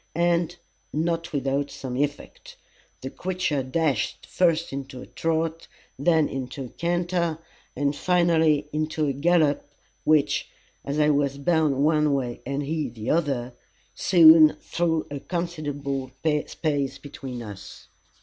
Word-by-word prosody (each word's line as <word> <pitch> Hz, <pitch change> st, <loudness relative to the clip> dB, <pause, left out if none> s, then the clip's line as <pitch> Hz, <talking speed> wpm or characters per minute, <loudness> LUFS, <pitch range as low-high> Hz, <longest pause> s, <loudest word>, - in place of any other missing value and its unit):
And, 170 Hz, 0 st, +1 dB, 0.4 s
not 165 Hz, +2 st, -1 dB
without 140 Hz, 0 st, -1 dB
some 135 Hz, -2 st, -6 dB
effect. 145 Hz, +2 st, -4 dB, 0.4 s
The 130 Hz, +1 st, -6 dB
creature 180 Hz, -6 st, -1 dB
dashed 135 Hz, -2 st, -1 dB
first 170 Hz, -4 st, +1 dB
into 135 Hz, -2 st, -6 dB
a -, -, -8 dB
trot, 165 Hz, 0 st, -2 dB, 0.3 s
then 160 Hz, 0 st, +3 dB
into 135 Hz, +1 st, -5 dB
a -, -, -9 dB
canter, 170 Hz, 0 st, -1 dB, 0.4 s
and 140 Hz, +1 st, 0 dB
finally 160 Hz, -3 st, +2 dB
into 155 Hz, 0 st, -1 dB
a 140 Hz, -, 0 dB
gallop, 155 Hz, 0 st, +2 dB, 0.4 s
which, 155 Hz, -2 st, +2 dB, 0.3 s
as 140 Hz, +2 st, -3 dB
I 150 Hz, 0 st, +4 dB
was 140 Hz, -1 st, +1 dB
bound 145 Hz, -2 st, +2 dB
one 150 Hz, -2 st, +3 dB
way 125 Hz, -3 st, -3 dB
and 140 Hz, +1 st, -2 dB
he 150 Hz, -1 st, -2 dB
the 110 Hz, -1 st, -4 dB
other, 135 Hz, -7 st, 0 dB, 0.4 s
soon 160 Hz, -3 st, +7 dB
threw 165 Hz, -2 st, -1 dB
a 145 Hz, -, -4 dB
considerable 145 Hz, -6 st, -3 dB, 0.4 s
space 145 Hz, -4 st, -2 dB
between 130 Hz, -4 st, -8 dB
us. 100 Hz, -3 st, -10 dB
150 Hz, 130 wpm, -25 LUFS, 140-165 Hz, 0.4 s, soon